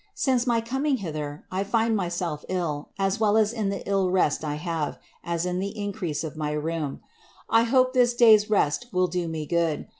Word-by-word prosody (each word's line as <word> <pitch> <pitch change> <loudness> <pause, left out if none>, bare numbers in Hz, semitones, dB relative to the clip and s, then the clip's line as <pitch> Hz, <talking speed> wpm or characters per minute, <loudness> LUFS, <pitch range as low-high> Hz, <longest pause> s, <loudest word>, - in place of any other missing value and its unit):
Since 255 -2 +1
my 235 -1 +2
coming 265 +4 0
hither, 155 -6 -5
I 190 +1 -1
find 225 +2 +1
myself 175 -5 -2
ill, 165 -6 -2
as 195 +2 0
well 215 -1 +3
M 220 - +5
in 215 -4 -1
the 200 - -4
iU 195 -2 +1
re$t 180 -5 +2
I 150 -1 -2
have, 160 -1 -3 0.3
as 170 0 -2
in 180 0 -1
the 200 +2 -4
increase 200 -7 -3
of 160 -1 -6
my 150 -1 -2
rheum. 150 -1 -3 0.5
'I 225 0 +5
hope 255 +1 +3
this 245 -2 +3
day's 220 -3 +6
rest 210 +2 +1
will 185 -1 +2
do 175 -1 -2
me 160 -2 -4
good. 165 -1 0
185 Hz, 200 wpm, -25 LUFS, 160-220 Hz, 0.5 s, day's